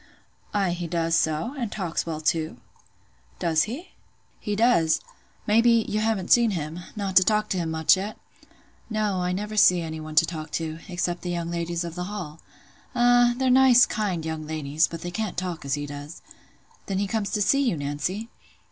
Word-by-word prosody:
"Ay, 195 Hz, -3 st, +1 dB
he 175 Hz, 0 st, -4 dB
does 165 Hz, 0 st, -1 dB
so; 160 Hz, -, 0 dB
and 235 Hz, -4 st, -3 dB
talks 175 Hz, -5 st, -3 dB
well 160 Hz, -2 st, -3 dB
too." 155 Hz, -3 st, -1 dB, 0.8 s
"Does 160 Hz, -3 st, +2 dB
he?" 290 Hz, +11 st, -7 dB, 0.5 s
"He 210 Hz, -, -3 dB
does. 170 Hz, -8 st, +3 dB, 0.5 s
Maybe, 230 Hz, +1 st, +4 dB
you 215 Hz, -, -1 dB
haven't 215 Hz, -4 st, -1 dB
seen 235 Hz, -1 st, +6 dB
him—not 180 Hz, +5 st, -5 dB
to 185 Hz, -, +8 dB
talk 215 Hz, +2 st, +1 dB
to 185 Hz, -, -1 dB
him 165 Hz, -2 st, -2 dB
much, 160 Hz, +2 st, +4 dB
yet?" 200 Hz, +3 st, -5 dB, 0.7 s
"No, 210 Hz, -4 st, 0 dB
I 180 Hz, 0 st, 0 dB
never 210 Hz, +3 st, -4 dB
see 180 Hz, -4 st, +6 dB
any 160 Hz, -1 st, -5 dB
one 155 Hz, 0 st, -8 dB
to 155 Hz, -, +6 dB
talk 160 Hz, -2 st, -6 dB
to—except 175 Hz, +3 st, -3 dB
the 180 Hz, -, -5 dB
young 170 Hz, -1 st, -3 dB
ladies 170 Hz, 0 st, -2 dB
of 170 Hz, -1 st, -6 dB
the 180 Hz, +1 st, -4 dB
Hall." 180 Hz, -6 st, -6 dB, 0.6 s
"Ah; 245 Hz, 0 st, +4 dB
they're 260 Hz, -1 st, +2 dB
nice, 250 Hz, -1 st, +7 dB
kind 190 Hz, -7 st, -2 dB
young 160 Hz, -1 st, -4 dB
ladies; 155 Hz, 0 st, 0 dB
but 165 Hz, -1 st, -8 dB
they 175 Hz, -, -5 dB
can't 215 Hz, 0 st, -3 dB
talk 180 Hz, -2 st, -3 dB
as 140 Hz, 0 st, 0 dB
he 145 Hz, 0 st, -4 dB
does." 145 Hz, +2 st, -9 dB, 0.6 s
"Then 195 Hz, -, -2 dB
he 200 Hz, -, +1 dB
comes 205 Hz, 0 st, -2 dB
to 210 Hz, -, +1 dB
see 275 Hz, +7 st, +3 dB
you, 240 Hz, -, +1 dB
Nancy?" 150 Hz, +10 st, -3 dB
180 Hz, 185 wpm, -25 LUFS, 160-215 Hz, 0.8 s, to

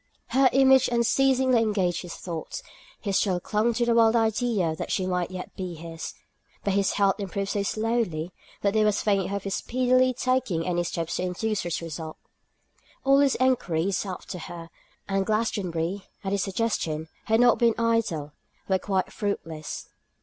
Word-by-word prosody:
Her 265 Hz, 0 st, +5 dB
image 265 Hz, 0 st, +5 dB
unceasingly 255 Hz, +1 st, +3 dB
engaged 195 Hz, -6 st, +1 dB
his 175 Hz, -2 st, -7 dB
thoughts; 165 Hz, -3 st, -6 dB, 0.4 s
he 205 Hz, -, -3 dB
still 190 Hz, -2 st, +2 dB
clung 215 Hz, +6 st, +1 dB
to 240 Hz, +1 st, +1 dB
the 235 Hz, -, +3 dB
wild 230 Hz, 0 st, +5 dB
idea 220 Hz, -6 st, +1 dB
that -, -, -5 dB
she 190 Hz, -, 0 dB
might 180 Hz, -2 st, -1 dB
yet 185 Hz, -1 st, -7 dB
be 180 Hz, -2 st, -5 dB
his. 165 Hz, 0 st, -7 dB, 0.5 s
But 200 Hz, -, +1 dB
his 200 Hz, -1 st, +2 dB
health 200 Hz, 0 st, +2 dB
improved 200 Hz, 0 st, -3 dB
so 205 Hz, -, 0 dB
slowly, 205 Hz, -6 st, -1 dB, 0.3 s
that 200 Hz, -1 st, +2 dB
there 215 Hz, -1 st, +3 dB
was 210 Hz, -1 st, +1 dB
faint 195 Hz, -3 st, +1 dB
hope 200 Hz, -, -2 dB
of 200 Hz, -, -3 dB
his 195 Hz, -, -3 dB
speedily 255 Hz, +2 st, +2 dB
taking 250 Hz, -10 st, 0 dB
any 175 Hz, -1 st, 0 dB
steps 165 Hz, -1 st, -3 dB
to -, -, -2 dB
induce 195 Hz, +4 st, -1 dB
such 170 Hz, -1 st, -3 dB
a -, -, -4 dB
result. 160 Hz, 0 st, -6 dB, 0.9 s
All 275 Hz, +1 st, +5 dB
his 280 Hz, -2 st, +4 dB
enquiries 195 Hz, -8 st, +1 dB
after 185 Hz, -1 st, -6 dB
her, 165 Hz, 0 st, -8 dB, 0.4 s
and 195 Hz, 0 st, +1 dB
Glastonbury, 195 Hz, -4 st, -1 dB, 0.2 s
at 195 Hz, -, -2 dB
his 200 Hz, -1 st, +1 dB
suggestion, 185 Hz, -6 st, -1 dB, 0.2 s
had 225 Hz, +1 st, +3 dB
not 245 Hz, -1 st, +5 dB
been 235 Hz, -2 st, +4 dB
idle, 230 Hz, -11 st, 0 dB, 0.4 s
were 190 Hz, -1 st, +2 dB
quite 190 Hz, -2 st, -1 dB
fruitless. 165 Hz, -7 st, -4 dB
200 Hz, 170 wpm, -26 LUFS, 175-230 Hz, 0.9 s, Her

